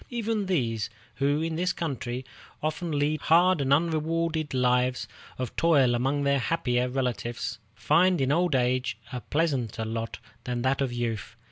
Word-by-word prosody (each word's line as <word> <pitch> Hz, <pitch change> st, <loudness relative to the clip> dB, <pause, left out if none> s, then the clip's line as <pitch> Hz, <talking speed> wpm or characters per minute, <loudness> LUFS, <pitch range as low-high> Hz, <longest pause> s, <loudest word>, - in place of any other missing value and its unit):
Even 225 Hz, -4 st, -1 dB
these, 115 Hz, -, 0 dB, 0.3 s
who 145 Hz, +3 st, +1 dB
in 165 Hz, -1 st, -2 dB
this 180 Hz, +1 st, +1 dB
country 130 Hz, -5 st, -4 dB, 0.4 s
often 155 Hz, +3 st, -2 dB
lead 150 Hz, +1 st, 0 dB
hard 175 Hz, 0 st, +4 dB
and 135 Hz, 0 st, 0 dB
unrewarded 160 Hz, 0 st, +1 dB
lives 125 Hz, 0 st, +1 dB, 0.3 s
of 130 Hz, -2 st, -4 dB
toil 145 Hz, -7 st, +4 dB
among 135 Hz, +4 st, 0 dB
their 140 Hz, 0 st, +2 dB
happier 125 Hz, -4 st, 0 dB
relatives, 120 Hz, -3 st, -2 dB, 0.2 s
find 175 Hz, +8 st, +3 dB
in 135 Hz, 0 st, +1 dB
old 170 Hz, -1 st, +2 dB
age 125 Hz, -2 st, +1 dB, 0.2 s
a 125 Hz, -, -3 dB
pleasanter 130 Hz, -9 st, -1 dB
lot 115 Hz, 0 st, -4 dB, 0.3 s
than 120 Hz, -1 st, -3 dB
that 135 Hz, +1 st, +1 dB
of 135 Hz, -2 st, 0 dB
youth. 120 Hz, -3 st, -3 dB
135 Hz, 150 wpm, -27 LUFS, 125-165 Hz, 0.4 s, hard